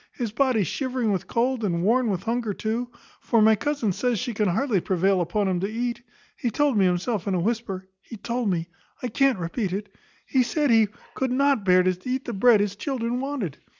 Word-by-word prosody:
His 235 Hz, -5 st, -3 dB
body 245 Hz, -2 st, +2 dB
shivering 255 Hz, -, -1 dB
with 190 Hz, -, -2 dB
cold, 245 Hz, 0 st, 0 dB
and 170 Hz, -4 st, 0 dB
worn 235 Hz, +4 st, +3 dB
with 190 Hz, -4 st, -2 dB
hunger 230 Hz, -3 st, -1 dB
too; 230 Hz, +3 st, -2 dB, 0.3 s
for 230 Hz, -, +1 dB
my 220 Hz, +1 st, +6 dB
cousin 280 Hz, -2 st, -1 dB
says 245 Hz, +5 st, 0 dB
she 240 Hz, +3 st, -3 dB
can 210 Hz, 0 st, +1 dB
hardly 205 Hz, +1 st, +1 dB
prevail 190 Hz, +1 st, +1 dB
upon 200 Hz, +4 st, 0 dB
him 185 Hz, -2 st, 0 dB
to 195 Hz, +3 st, -2 dB
eat. 240 Hz, +1 st, -3 dB, 0.3 s
He 240 Hz, -, -2 dB
told 285 Hz, +3 st, +1 dB
me 200 Hz, -2 st, +4 dB
himself 185 Hz, +4 st, 0 dB
in 195 Hz, -, +1 dB
a -, -, +1 dB
whisper 195 Hz, -2 st, -2 dB
he 230 Hz, -, -10 dB
told 235 Hz, +2 st, -2 dB
me 170 Hz, -3 st, -1 dB, 0.4 s
I 250 Hz, -, -1 dB
can't 270 Hz, +1 st, +2 dB
repeat 180 Hz, +3 st, -3 dB
it 200 Hz, 0 st, -5 dB, 0.3 s
he 260 Hz, -, +2 dB
said 285 Hz, +3 st, +1 dB
he 225 Hz, -2 st, +5 dB, 0.3 s
could 260 Hz, -1 st, -1 dB
not 275 Hz, -3 st, +2 dB
bear 185 Hz, -1 st, +5 dB
to 185 Hz, -1 st, 0 dB
eat 260 Hz, +1 st, -2 dB
the 240 Hz, -, -4 dB
bread 215 Hz, +1 st, +5 dB
his 205 Hz, -1 st, -1 dB
children 245 Hz, 0 st, -2 dB
wanted. 260 Hz, -, -4 dB
225 Hz, 215 wpm, -25 LUFS, 195-250 Hz, 0.4 s, my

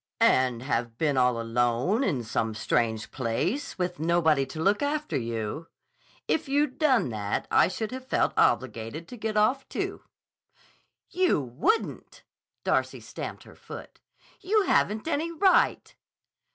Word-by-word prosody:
"And 125 Hz, -2 st, +3 dB
have 115 Hz, -3 st, -2 dB
been 150 Hz, -1 st, +1 dB
alone 120 Hz, -, +1 dB
in 140 Hz, -, 0 dB
some 110 Hz, 0 st, -2 dB
strange 110 Hz, 0 st, 0 dB
place 150 Hz, -, -2 dB
with 180 Hz, -1 st, -2 dB
nobody 160 Hz, -4 st, +2 dB
to 155 Hz, -, -8 dB
look 200 Hz, +5 st, +2 dB
after 300 Hz, +1 st, -1 dB
you? 115 Hz, +5 st, -3 dB, 0.6 s
If 295 Hz, -, 0 dB
you'd 285 Hz, -1 st, +1 dB
done 260 Hz, -, +3 dB
that, 105 Hz, -3 st, -2 dB
I -, -, +5 dB
should 215 Hz, +4 st, -4 dB
have 260 Hz, 0 st, -7 dB
felt -, -, +1 dB
obligated 120 Hz, +6 st, 0 dB
to -, -, -8 dB
get 215 Hz, -2 st, -3 dB
off, 255 Hz, +6 st, +2 dB
too." -, -, -3 dB, 1.1 s
"You 365 Hz, -, +2 dB
wouldn't!" 135 Hz, -, -2 dB, 0.4 s
Darcy -, -, 0 dB
stamped -, -, -7 dB
her -, -, -15 dB
foot. -, -, -11 dB, 0.4 s
"You 415 Hz, +2 st, +2 dB
haven't 215 Hz, -, +1 dB
any 330 Hz, +1 st, -1 dB
right." 375 Hz, +3 st, +2 dB
160 Hz, 135 wpm, -27 LUFS, -, 1.1 s, I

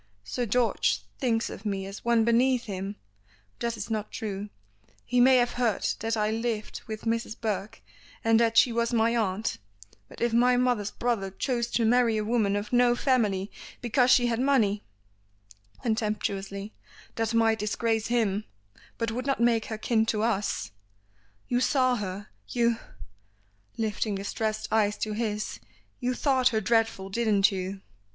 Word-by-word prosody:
Sir 240 Hz, -, -3 dB
George 205 Hz, -, +1 dB, 0.2 s
thinks 230 Hz, -2 st, +1 dB
of -, -, -8 dB
me 195 Hz, -3 st, -2 dB
as 195 Hz, +1 st, -8 dB
one 235 Hz, -1 st, +3 dB
beneath 245 Hz, +2 st, +3 dB
him; 195 Hz, 0 st, -5 dB, 0.6 s
that 235 Hz, -1 st, -2 dB
is 220 Hz, +2 st, -6 dB
not 215 Hz, -1 st, -2 dB
true. 205 Hz, -1 st, -5 dB, 0.6 s
He 245 Hz, 0 st, +1 dB
may 260 Hz, +2 st, +7 dB
have 245 Hz, -1 st, +3 dB
heard 240 Hz, -4 st, 0 dB
that 225 Hz, +1 st, -1 dB
I 210 Hz, 0 st, +1 dB
lived 225 Hz, -1 st, -3 dB
with 220 Hz, -1 st, -6 dB
Mrs. 230 Hz, -1 st, -2 dB
Burke, 210 Hz, -2 st, -3 dB, 0.4 s
and 225 Hz, 0 st, +4 dB
that 230 Hz, -1 st, +2 dB
she 240 Hz, -, +6 dB
was 235 Hz, +1 st, 0 dB
my 230 Hz, 0 st, +2 dB
aunt; 215 Hz, -1 st, -1 dB, 0.5 s
but -, -, -13 dB
if 235 Hz, -1 st, 0 dB
my 245 Hz, +1 st, +4 dB
mother's 245 Hz, -5 st, +1 dB
brother 230 Hz, -5 st, -1 dB
chose 235 Hz, +4 st, -1 dB
to 230 Hz, -, +2 dB
marry 235 Hz, -1 st, +3 dB
a 215 Hz, -, 0 dB
woman 215 Hz, -3 st, +1 dB
of 205 Hz, +3 st, -4 dB
no 245 Hz, 0 st, +5 dB
family 215 Hz, -7 st, +1 dB, 0.3 s
because 245 Hz, +1 st, +2 dB
she 245 Hz, -1 st, +6 dB
had 235 Hz, -1 st, 0 dB
money," 230 Hz, -7 st, +2 dB, 1.0 s
contemptuously, 210 Hz, -3 st, -2 dB, 0.4 s
"that 225 Hz, 0 st, -1 dB
might 225 Hz, -1 st, +3 dB
disgrace 225 Hz, +1 st, 0 dB
him, 215 Hz, -3 st, 0 dB, 0.5 s
but 230 Hz, -1 st, -1 dB
would 250 Hz, +4 st, -4 dB
not 275 Hz, -, +1 dB
make 235 Hz, -2 st, +3 dB
her 220 Hz, -, -5 dB
kin 220 Hz, 0 st, +1 dB
to 215 Hz, -1 st, 0 dB
us. 210 Hz, -, -1 dB, 0.8 s
You 245 Hz, -, +1 dB
saw 255 Hz, -2 st, +2 dB
her, 200 Hz, 0 st, -5 dB, 0.2 s
you 235 Hz, -1 st, +1 dB, 0.5 s
" 100 Hz, 0 st, -39 dB
lifting 215 Hz, -1 st, -1 dB
distressed 215 Hz, +2 st, -2 dB
eyes 210 Hz, -1 st, +2 dB
to 215 Hz, -, -2 dB
his 210 Hz, -1 st, -3 dB, 0.4 s
"you 250 Hz, 0 st, -1 dB
thought 260 Hz, -1 st, +2 dB
her 225 Hz, -4 st, +2 dB
dreadful, 225 Hz, -2 st, +1 dB
didn't 210 Hz, -3 st, +3 dB
you?" 190 Hz, 0 st, -4 dB
225 Hz, 160 wpm, -27 LUFS, 205-240 Hz, 1.0 s, may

